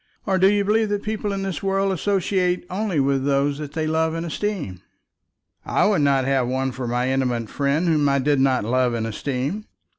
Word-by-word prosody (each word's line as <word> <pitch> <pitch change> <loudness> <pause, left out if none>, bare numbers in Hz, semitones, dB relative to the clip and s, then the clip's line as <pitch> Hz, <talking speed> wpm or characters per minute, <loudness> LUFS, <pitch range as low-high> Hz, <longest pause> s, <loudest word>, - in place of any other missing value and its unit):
Or 190 -2 +1
do 190 - +6
you 205 0 +1
believe 215 +1 +2
that 205 0 -2
people 215 -1 -2
in 195 -1 -3
this 190 -3 -3
world 195 0 +1
associate 185 -1 0
only 190 -4 -1
with 135 -1 +1
those 140 +1 +1
they 150 +1 -3
love 160 +1 0
and 165 +1 -3
esteem?" 165 - -4 0.8
"I - - +1
would 200 -6 +2
not 135 -2 +2
have 135 -2 +1
one 130 +1 -1
for 125 0 -5
my 125 +2 0
intimate 125 -4 -1
friend 145 +5 0
whom 150 -3 +3
I 140 - +2
did 140 +1 +1
not 130 -4 +2
love 125 +1 +1
and 115 -1 -2
esteem." 135 - -3
145 Hz, 200 wpm, -22 LUFS, 130-195 Hz, 0.8 s, do